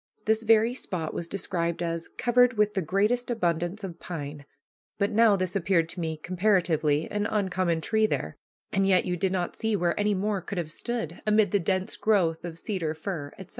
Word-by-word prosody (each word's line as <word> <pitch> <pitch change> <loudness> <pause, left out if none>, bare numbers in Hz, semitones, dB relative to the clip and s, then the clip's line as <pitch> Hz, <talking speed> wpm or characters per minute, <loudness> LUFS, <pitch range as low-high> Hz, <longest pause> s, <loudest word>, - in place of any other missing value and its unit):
This 220 +1 +2
very 225 +1 +4
spot 175 -10 -4
was 170 - -4
described 175 -3 -2
as 165 0 -3
"covered 245 0 +3
with 210 0 +3
the 190 - 0
greatest 210 +9 +1
abundance 175 -2 -1
of 175 -3 -6
pine," 145 -4 -6 0.5
but 200 0 +1
now 220 -1 +5
this 185 0 -2
appeared 175 -3 +2
to 180 - -5
me, 160 -2 -2
comparatively, 170 -4 +1
an 205 0 0
uncommon 185 -5 0
tree 220 +4 +2
there - - -3 0.4
and 195 0 +2
yet 185 -2 +4
you 180 - -1
did 185 +2 0
not 180 -2 -2
see 220 -1 0
where 175 -1 0
any 205 0 +2
more 200 0 -1
could 200 +2 -6
have 165 -3 -3
stood, 225 -4 -4
amid 210 -2 +4
the 205 - +3
dense 185 +1 -1
growth 175 -7 +2
of 170 -2 -6
cedar, 165 -4 -3
fir, 160 -4 -5
etc. 190 - -10
185 Hz, 195 wpm, -27 LUFS, 170-210 Hz, 0.5 s, now